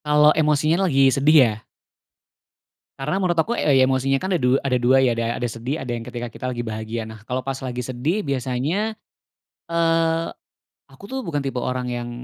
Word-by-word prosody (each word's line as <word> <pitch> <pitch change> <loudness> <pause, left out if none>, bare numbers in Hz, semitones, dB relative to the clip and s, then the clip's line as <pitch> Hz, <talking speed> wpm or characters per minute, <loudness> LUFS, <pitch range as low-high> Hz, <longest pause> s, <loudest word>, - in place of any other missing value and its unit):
Kalau 150 0 +5
emosinya 155 +4 +2
lagi 135 -2 +4
sedih 150 +3 +4
ya? 110 - 0 1.5
Karena 150 +6 -2
menurut 175 -2 0
aku 225 +9 +1
e 150 - +1
ya 130 - +6
emosinya 135 +1 +1
kan 190 +3 -1
ada - - 0
du 125 +2 +3
ada 130 -2 0
2 125 +2 +4
ya 130 -2 +3
ada 115 0 -2
ada 120 - -1
sedih 120 +6 -4
ada 130 -2 -5
yang 115 - -6
ketika 120 0 -6
kita 115 - -9
lagi 120 -1 -4
bahagia. 110 +1 -4
Nah, 110 -1 -11
kalau 125 +3 -3
pas 135 0 -3
lagi 125 -1 -4
sedih 130 - -2
biasanya, 140 - -1 0.7
eee, 165 0 +1 0.6
aku 135 +6 -18
tuh 265 - -2
bukan 145 -4 -2
tipe 135 -2 -3
orang 125 0 -2
yang, 120 0 -4
135 Hz, 190 wpm, -22 LUFS, 125-155 Hz, 1.5 s, ya